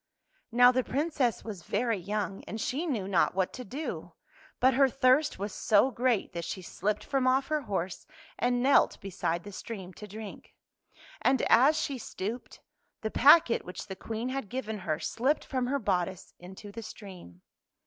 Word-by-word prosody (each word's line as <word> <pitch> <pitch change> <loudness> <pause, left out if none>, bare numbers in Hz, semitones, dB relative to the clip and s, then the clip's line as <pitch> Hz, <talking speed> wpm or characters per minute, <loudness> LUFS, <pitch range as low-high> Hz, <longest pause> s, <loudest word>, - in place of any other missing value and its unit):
" - - -39
Now 245 +1 +7
the 255 0 +1
Princess 280 -3 0
was 205 -6 -7
very 220 +5 -1
young, 195 +1 -3
and 220 - -6
she 295 +10 -2
knew 220 - -2
not 185 -3 +2
what 190 -1 0
to 255 - -7
do. 275 +8 -6 0.5
But 260 +1 +4
her 270 +1 +4
thirst 270 +3 +3
was 200 +1 -4
so 215 +5 +3
great 240 -3 0
that 170 0 -4
she 185 +2 -5
slipped 210 +4 -2
from 270 -2 0
off 265 +1 +2
her 305 -1 +1
horse 190 -7 -4 0.3
and 245 0 +1
knelt 275 +1 +4
beside 175 -3 -3
the 205 - -9
stream 190 -2 -7
to 210 - -10
drink. 210 +1 -10 0.7
And 260 -1 +2
as 275 +7 +5
she 270 -3 -2
stooped, 225 +3 -6 0.4
the 220 - -3
packet 280 -2 +6
which 180 - -7
the 190 - -7
Queen 225 +5 -4
had 260 -6 -4
given 220 -4 -4
her, 155 -4 -2
slipped 265 +6 0
from 255 -2 -1
her 280 +2 +1
bodice 185 -6 -2
into 190 +3 -10
the 230 +3 -7
stream. 185 - -11
225 Hz, 180 wpm, -29 LUFS, 195-260 Hz, 0.7 s, Now